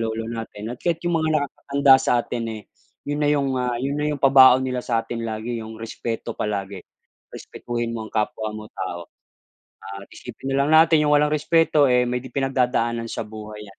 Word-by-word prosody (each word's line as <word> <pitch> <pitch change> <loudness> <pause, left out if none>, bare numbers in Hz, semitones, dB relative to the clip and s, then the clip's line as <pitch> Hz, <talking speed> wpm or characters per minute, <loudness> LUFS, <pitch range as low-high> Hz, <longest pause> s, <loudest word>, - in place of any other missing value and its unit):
lolo 115 0 -2
natin 115 -1 -6
at 125 - -9
kahit 170 -1 -1
yung 175 -1 +1
mga 160 - 0
nakakatanda 140 -1 +3
sa 130 - +1
atin 120 -1 -4 0.2
eh, - - -18 0.5
yun 145 0 -1
na 145 - +2
yung, 140 -2 +1
ah, 125 -1 -1
yun 140 +2 -2
na 150 - 0
yung 140 - -5
pabaon 130 -1 +7
nila 130 -1 -2
sa 115 -2 +1
atin 115 -1 -5
lagi 115 +2 -4
yung 110 0 -9
respeto 115 0 -5
palagi. 100 -2 -3 0.5
Respetuhin 120 -1 -5
mo 110 - -5
ang - - -15
kapwa 110 0 -2
mo 105 0 -9
tao, 85 -2 -6 0.7
na 100 +1 -8
isipin 135 +2 -7
na - - +2
lang 150 - -1
natin 160 0 +6
yung 150 - +4
walang 150 0 +2
respeto 155 -1 +3
eh, 125 0 +4
may 125 0 -1
pinagdadaanan 125 -3 -1
sa - - -4
buhay 105 0 -9
yan, 95 - -17
120 Hz, 195 wpm, -23 LUFS, 110-140 Hz, 0.7 s, pabaon